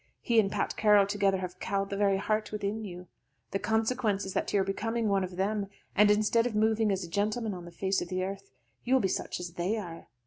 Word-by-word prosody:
He 235 -3 +3
and 195 -2 +2
Pat - - -1
Carroll 210 -2 +5
together 200 -1 +1
have 185 -1 -6
cowed 195 0 -2
the - - -1
very 195 -1 +2
heart 215 +2 -1
within 210 +1 -3
you. 180 -3 -8 0.5
The 195 - -1
consequence 220 -2 0
is 190 - -5
that - - -1
you 205 - +3
are - - +3
becoming 225 +3 -1
one 195 -1 +2
of 180 -1 -5
them, 200 +2 -1 0.3
and 210 +1 +6
instead 215 +3 +3
of 225 - -4
moving 220 0 +2
as 190 -1 -1
a - - -6
gentleman 210 +4 -1
on 175 -2 -8
the 175 - -10
face 190 +3 0
of - - -4
the 185 0 -1
earth, 195 +1 -5 0.3
you 255 +2 +2
will - - +5
be 195 - +2
such 180 - -3
as 175 -1 -5
they 180 +5 -1
are. 170 -6 -7
200 Hz, 245 wpm, -29 LUFS, 190-215 Hz, 0.5 s, and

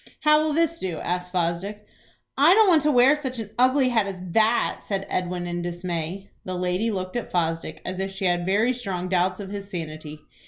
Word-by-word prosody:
"How 300 0 +5
will 310 0 0
this 330 +1 +1
do?" 175 -4 -3
asked 180 +2 -3
Fosdick. 185 +4 -2 0.5
"I 310 +7 +6
don't 440 -1 +6
want 325 -4 +5
to 300 - +2
wear 260 +2 +6
such 260 -4 -5
an 220 -2 -6
ugly 255 +1 +4
hat 225 -4 +1
as 190 -2 -6
that," 220 +4 +2
said 195 -1 -3
Edwin, 180 -1 -2
in 175 0 -3
dismay. 175 +2 -4
The 185 - -4
lady 180 +5 0
looked 185 -2 -4
at 240 - -3
Fosdick 165 -2 -2
as 185 0 -4
if 195 0 -2
she 195 0 -4
had 175 -1 +1
very 210 +7 +2
strong 190 -7 -4
doubts 185 +1 +1
of 195 -1 -7
his 200 -1 -6
sanity. 155 -4 -6
195 Hz, 205 wpm, -24 LUFS, 180-245 Hz, 0.5 s, I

